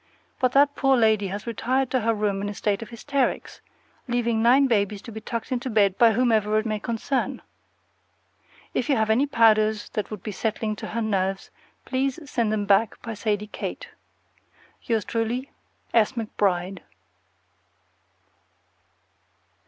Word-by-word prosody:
But 255 -1 +1
that 285 +1 +5
poor 270 -1 +3
lady 220 -3 +3
has 200 +3 -5
retired 250 +3 -1
to 255 - +2
her 230 0 +1
room 205 -2 -1
in 205 - -2
a 205 - -6
state 205 0 -1
of 225 - -8
hysterics, 265 +3 -2 0.5
leaving 235 -2 0
nine 255 +4 +5
babies 205 -4 0
to 230 - -9
be 220 0 -7
tucked 230 +2 -5
into 255 +1 -2
bed 200 -4 +3
by 230 -2 +6
whomever 220 -3 +2
it 215 - 0
may 215 -1 -1
concern. 235 +4 -2 1.3
If 250 - -1
you 280 - +4
have 220 -1 +1
any 260 +6 +3
powders 215 -4 +3
that 210 - -3
would 210 -3 -7
be 215 - -4
settling 215 +1 -2
to - - -6
her 230 +1 -2
nerves, 195 -2 -1 0.3
please 265 0 -1
send 235 -5 0
them 210 -1 -1
back 205 +2 +2
by 230 - -5
Sadie 210 -1 -1
Kate. - - -6 0.9
Yours 225 -3 -1
truly, 235 +4 -2 0.4
S. 225 +1 +3
McBRIDE. 195 -5 -1
220 Hz, 150 wpm, -25 LUFS, 210-245 Hz, 1.3 s, by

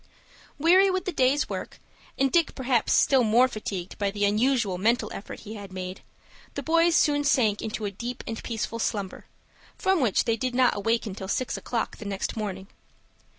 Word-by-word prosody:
Weary 365 +6 +5
with 370 0 -1
the 370 - -1
day's 270 -1 +2
work, - - -6 0.4
and 270 0 +2
Dick 335 -4 +2
perhaps 255 -3 +1
still 265 -3 +4
more 235 +3 +5
fatigued 200 -6 -6
by 200 -1 +1
the 205 +1 0
unusual 215 -2 +1
mental 230 +6 +1
effort 195 - -8
he 215 - -8
had 200 -3 -9
made, 185 0 -6 0.5
the - - -4
boys 335 +1 +3
soon 290 -1 +3
sank 230 -8 +2
into 220 0 -4
a 200 - -2
deep 235 +5 -6
and 225 -1 -5
peaceful 230 0 -3
slumber, 200 -4 -3 0.5
from 380 -4 +2
which 230 -7 +2
they 230 0 0
did 255 +1 -2
not 255 -1 +4
awaken 220 0 -1
till 190 0 -7
six 255 +5 -1
o'clock 235 -2 -3
the 215 - -9
next 195 -1 -3
morning. 195 -3 -4
230 Hz, 185 wpm, -26 LUFS, 205-265 Hz, 0.5 s, Weary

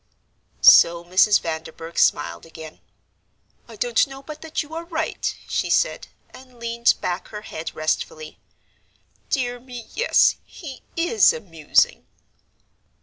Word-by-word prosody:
So 170 0 +7
Mrs. 190 +4 +4
Vanderburgh 160 0 -5
smiled 145 - +1
again. 160 -1 -11 0.9
"I - - -12
don't 485 -10 +1
know 270 0 -11
but 305 +1 -9
that 320 -1 -3
you 300 +2 -14
are 330 +1 -4
right," 325 -2 -3
she - - -1
said, - - +1 0.2
and 255 -2 -16
leaned 235 0 +2
back 180 0 -3
her 210 -1 -9
head 160 -5 -7
restfully. 155 0 -3 0.9
"Dear 245 -3 -1
me, 245 -2 -10
yes, 480 +3 +3
he 285 -7 -11
is 350 +6 +4
amusing." 165 -9 0
235 Hz, 125 wpm, -22 LUFS, -, 0.9 s, So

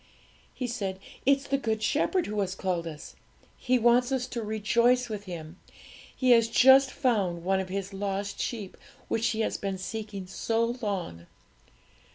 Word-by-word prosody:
'He 255 - -3
said, 200 -6 -3 0.3
"It's 275 0 +4
the 275 0 +1
Good 220 -4 -1
Shepherd 345 - +1
who 210 0 -3
has 190 -1 -1
called 180 -3 -2
us; 155 -1 -9 0.4
He 255 0 +1
wants 240 +2 +3
us 260 -2 0
to 235 - -4
rejoice 235 +3 +2
with 210 -2 -5
Him; 170 -1 -8 0.6
He 255 -2 +2
has 230 -1 +6
just 265 +3 +6
found 200 -12 0
one 190 +1 +1
of 190 - -3
the 195 +1 -2
lost 200 0 -3
sheep, 210 -6 -4 0.3
which 225 +1 +1
He 220 0 -1
has - - -1
been 195 -1 -3
seeking 200 0 -6
so 230 +5 -1
long. 175 - -4
215 Hz, 165 wpm, -28 LUFS, 190-245 Hz, 0.6 s, has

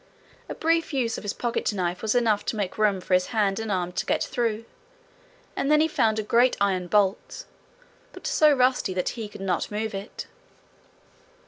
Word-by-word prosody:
A - - -5
brief 330 -1 0
use 240 -4 -1
of - - -13
his 205 - -2
pocket 240 -2 -1
knife 180 -3 -2
was 220 +1 0
enough 220 -4 +2
to - - -2
make 205 -1 -3
room 205 -3 +2
for 185 - -3
his 180 0 +3
hand 210 -3 0
and 225 -1 -3
arm 180 -2 -1
to 190 - -3
get - - +1
through, 230 -2 -2 0.9
and 275 - -1
then 300 0 +5
he 315 - +4
found 220 -8 +1
a 215 - -1
great 240 +4 +3
iron 190 -3 0
bolt 205 - 0 0.7
but - - -13
so 310 -12 +4
rusty 255 -8 +2
that 180 - 0
he 225 -3 -6
could 210 - -11
not 185 -3 -1
move 215 +1 -3
it. 195 +2 -6
215 Hz, 195 wpm, -25 LUFS, 195-240 Hz, 0.9 s, then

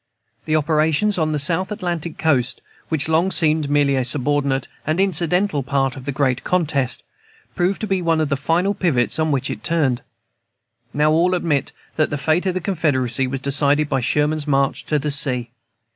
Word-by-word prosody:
The 155 - 0
operations 155 +6 +1
on 155 -1 +1
the 150 - 0
South 170 +7 -1
Atlantic 175 -5 -4
coast, 130 -6 0 0.3
which 160 -2 0
long 160 +4 +2
seemed 155 -4 +2
a - - -4
merely 140 -2 +2
subordinate 140 0 0 0.2
and 155 +4 -1
incidental 180 -3 +1
part 135 0 -1
of 130 - -10
the 140 - -2
great 130 -2 0
contest, 140 -8 -1 0.5
proved 180 +2 0
to - - -1
be 195 -2 0
one 165 -2 +1
of 155 -2 0
the 140 - +1
final 170 +8 0
pivots 160 -9 0
on 155 -1 +1
which 135 -3 -1
it - - -7
turned. 155 -8 0 1.0
All 155 +4 +3
now 185 - +1
admit 150 -6 -1 0.3
that 155 - +2
the 145 - -2
fate 160 +6 0
of 185 - -1
the - - 0
Confederacy 135 - 0
was 130 0 -4
decided 140 +2 +2
by 135 - 0
Sherman's 150 +4 0
march 135 -1 0
to 150 - +1
the 150 +1 -2
sea. 130 -4 +2
150 Hz, 185 wpm, -20 LUFS, 140-170 Hz, 1.0 s, All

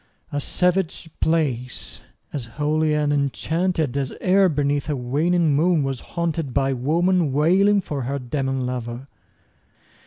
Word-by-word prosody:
A 145 - -1
savage 180 +1 0
place! 135 -7 -1 0.3
as 140 -6 -3
holy 155 +1 +1
and 150 -1 +1
enchanted 155 +1 0
As 140 -2 -1
e'er 190 0 +4
beneath 145 -1 0
a 150 - +1
waning 150 +5 +1
moon 165 0 +3
was 135 -2 -2
haunted 165 0 -2
15 130 - -9
By 135 -1 +1
woman 165 +5 +1
wailing 190 +8 +4
for 145 -6 -4
her 135 +3 -2
demon 135 0 -2
lover! 125 +1 -5
150 Hz, 135 wpm, -23 LUFS, 135-170 Hz, 0.3 s, e'er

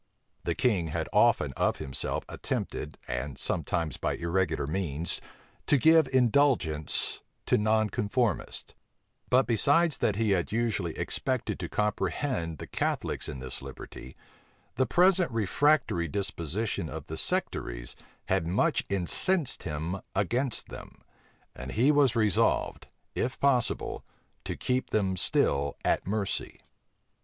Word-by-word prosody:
The - - 0
king 100 -9 +1
had 80 - -3
often - - +4
of - - +1
himself 65 - -3
attempted, 75 - -4
and 60 +3 -4
sometimes 80 -5 -2
by - - -1
irregular 85 -3 0
means, 80 -1 -2 0.5
to 145 - +5
give 160 +2 +5
indulgence 125 - +3 0.3
to - - +3
nonconformists: 110 0 0 0.6
but 130 +1 +4
besides 145 +8 +3
that 105 - +1
he 110 -1 +1
had 90 -3 +1
usually 105 -7 -1
expected - - -2
to - - -4
comprehend 105 - -1
the - - -7
Catholics - - -2
in - - -5
this 65 -1 -5
liberty, 65 - -10 0.6
the 130 - +1
present 180 0 +4
refractory 115 - +2
disposition 90 +1 -1
of 80 -2 -7
the 80 - -6
sectaries - - -2 0.3
had 80 - 0
much 135 - +1
incensed 120 - 0
him 80 +4 -4
against 120 +6 0
them; - - -11 0.5
and 65 0 -7
he 125 +7 +4
was 145 -4 +3
resolved, 110 -5 +1 0.3
if 125 0 -2
possible, 135 -4 +1 0.4
to - - -3
keep 130 0 -1
them 95 -3 +1
still 70 -5 +1
at - - +1
mercy. 100 -1 -2
105 Hz, 125 wpm, -29 LUFS, 80-130 Hz, 0.6 s, to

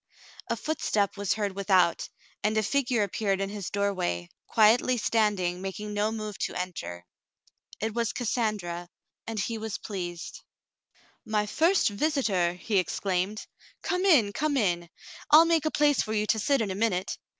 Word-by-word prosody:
A - - -1
footstep 215 -10 -1
was 200 -1 0
heard 205 -2 -1
without, 190 -3 +2 0.3
and 215 +1 +1
a 215 - +2
figure 245 -2 +1
appeared 200 0 -1
in 195 0 -2
his 205 -3 -5
doorway, 185 - -1 0.2
quietly 230 +3 +4
standing, 205 -6 +1
making 210 +2 -5
no 210 +1 0
move 215 -2 -5
to - - -2
enter. 165 - -5 0.7
It 220 0 -2
was 235 -1 0
Cassandra, 205 -8 -2 0.4
and 225 -1 -3
he 225 +3 -2
was 220 -1 -4
pleased. 175 -4 -6 0.8
*'My 215 -2 0
first 330 - +3
visitor 205 - +1
!" 180 - -15
he 205 -1 +1
exclaimed. 185 +3 -2 0.4
"Come 365 0 0
in, 265 - +4
come 295 +2 0
in. 175 -7 0 0.4
I'll 315 +2 +8
make 330 -2 +2
a - - +3
place 295 -1 +3
for 215 - -3
you 210 -1 +1
to 220 +1 +1
sit 275 +4 +2
in 205 -3 -1
a - - -1
minute." 195 -3 -1
210 Hz, 160 wpm, -27 LUFS, 190-230 Hz, 0.8 s, I'll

